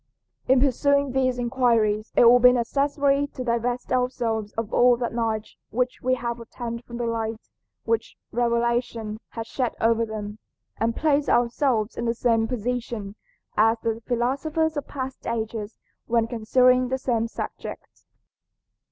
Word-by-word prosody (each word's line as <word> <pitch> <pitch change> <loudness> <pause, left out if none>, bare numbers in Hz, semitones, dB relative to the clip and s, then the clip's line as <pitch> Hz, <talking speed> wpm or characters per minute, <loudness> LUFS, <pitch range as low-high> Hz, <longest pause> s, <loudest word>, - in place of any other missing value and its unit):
In 260 0 +5
pursuing 280 +1 +2
these 255 -1 +1
inquiries 235 -4 +1
it - - +6
will 245 +1 +8
be 250 0 +8
necessary 280 +3 +1
to 255 - -4
divest 240 +1 -1
ourselves 235 -4 0
of 225 -1 -4
all 245 0 +5
that 240 -1 -3
knowledge 225 -2 -2
which 250 +2 -1
we 255 +1 +2
have 235 -1 -4
obtained 235 0 -6
from 235 - -8
the 240 - -2
light 225 -1 -3 0.3
which 225 0 -1
revelation 235 -2 0
has 225 -1 -4
shed 250 +1 -2
over 230 0 +3
them, 215 -1 -6 0.4
and 230 +1 0
place 295 -2 +1
ourselves 240 -2 +1
in 235 - -2
the 230 0 0
same 225 -1 +2
position 235 -3 -3 0.4
as 225 +2 +4
the 225 0 -1
philosophers 295 +7 0
of 290 - -4
past 260 -2 -6
ages 220 -2 -3 0.3
when 230 -1 +2
considering 250 +2 +3
the 260 +1 -1
same 235 -3 0
subject. - - -7
235 Hz, 145 wpm, -25 LUFS, 225-255 Hz, 0.4 s, will